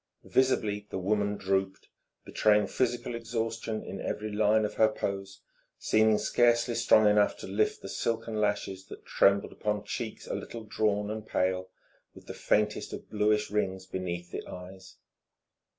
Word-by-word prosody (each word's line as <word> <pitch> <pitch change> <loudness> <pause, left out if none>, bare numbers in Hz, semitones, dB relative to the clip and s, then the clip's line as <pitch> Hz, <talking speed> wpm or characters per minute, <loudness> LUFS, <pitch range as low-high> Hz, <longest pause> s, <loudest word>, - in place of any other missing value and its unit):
Visibly 105 -6 +1
the - - -4
woman 100 +2 0
drooped, 95 0 -1 0.4
betraying 105 -1 +3
physical 120 -1 -1
exhaustion 115 -1 -3
in 95 +1 -7
every 105 0 -3
line 105 +1 +3
of 105 - -4
her 110 - +4
pose, 100 -2 -4 0.4
seeming 110 0 +3
scarcely 120 +2 +2
strong 115 -2 +5
enough 105 0 +3
to - - -8
lift 105 +3 0
the - - -6
silken 110 +1 -2
lashes 95 -2 -1
that - - -11
trembled 100 0 +3
upon 105 -1 -2
cheeks 110 +2 -5
a - - -5
little 115 -1 -6
drawn 105 -1 0
and 110 0 -6
pale, 95 0 0 0.5
with - - -14
the - - -7
faintest 105 0 0
of - - -9
bluish 105 0 +1
rings 95 -3 -1
beneath 90 -2 -5
the - - -5
eyes. 95 +1 -10
105 Hz, 150 wpm, -29 LUFS, 95-110 Hz, 0.5 s, strong